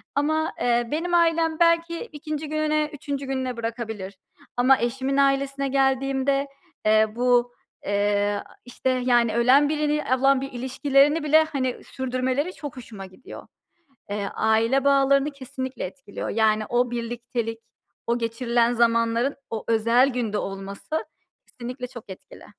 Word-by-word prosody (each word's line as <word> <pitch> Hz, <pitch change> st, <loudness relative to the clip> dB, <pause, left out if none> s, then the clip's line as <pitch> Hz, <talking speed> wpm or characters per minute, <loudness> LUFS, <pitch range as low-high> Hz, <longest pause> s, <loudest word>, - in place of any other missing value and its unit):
ama, 315 Hz, +2 st, 0 dB
eee, 240 Hz, -1 st, +2 dB
benim 335 Hz, +4 st, -2 dB
ailem 330 Hz, -2 st, +2 dB
belki 335 Hz, 0 st, +3 dB
2. 305 Hz, -6 st, -6 dB
gününe, 305 Hz, 0 st, 0 dB
3. 280 Hz, -1 st, -5 dB
gününe 260 Hz, -2 st, -3 dB
bırakabilir 220 Hz, -4 st, -5 dB, 0.4 s
ama 260 Hz, +2 st, +5 dB
eşimin 265 Hz, +3 st, -1 dB
ailesine 275 Hz, 0 st, +1 dB
geldiğimde, 270 Hz, +1 st, +1 dB, 0.4 s
eee, 215 Hz, 0 st, +5 dB
bu, 245 Hz, 0 st, +2 dB, 0.3 s
eee, 205 Hz, 0 st, +1 dB, 0.2 s
işte, 245 Hz, +1 st, -3 dB
yani, 245 Hz, -3 st, +2 dB
ölen 265 Hz, +5 st, +5 dB
birini 300 Hz, 0 st, 0 dB, 0.2 s
olan 270 Hz, 0 st, +4 dB
bir 275 Hz, -, -5 dB
ilişkilerini 275 Hz, +4 st, +2 dB
bile, 310 Hz, +1 st, +5 dB
hani, 260 Hz, -4 st, -2 dB
sürdürmeleri 260 Hz, +5 st, -2 dB
çok 290 Hz, -7 st, -8 dB
hoşuma 215 Hz, -5 st, -9 dB
gidiyor. 190 Hz, +7 st, -12 dB, 0.6 s
Eee, 205 Hz, 0 st, -2 dB
aile 225 Hz, +5 st, +2 dB
bağlarını 275 Hz, +1 st, +3 dB
kesinlikle 260 Hz, -2 st, -6 dB
etkiliyor. 200 Hz, +3 st, -7 dB
Yani, 215 Hz, 0 st, +2 dB
o 245 Hz, 0 st, +1 dB
birliktelik, 235 Hz, -1 st, -4 dB, 0.5 s
o 235 Hz, +1 st, +1 dB
geçirilen 235 Hz, 0 st, +1 dB
zamanların 230 Hz, +2 st, +2 dB
o 220 Hz, -1 st, -4 dB
özel 230 Hz, +4 st, +3 dB
günde 235 Hz, -5 st, -2 dB
olması 195 Hz, +11 st, -4 dB, 0.4 s
kesinlikle 250 Hz, +1 st, -7 dB
çok 240 Hz, -4 st, -12 dB
etkili. 190 Hz, -, -12 dB
255 Hz, 130 wpm, -24 LUFS, 230-280 Hz, 0.6 s, ama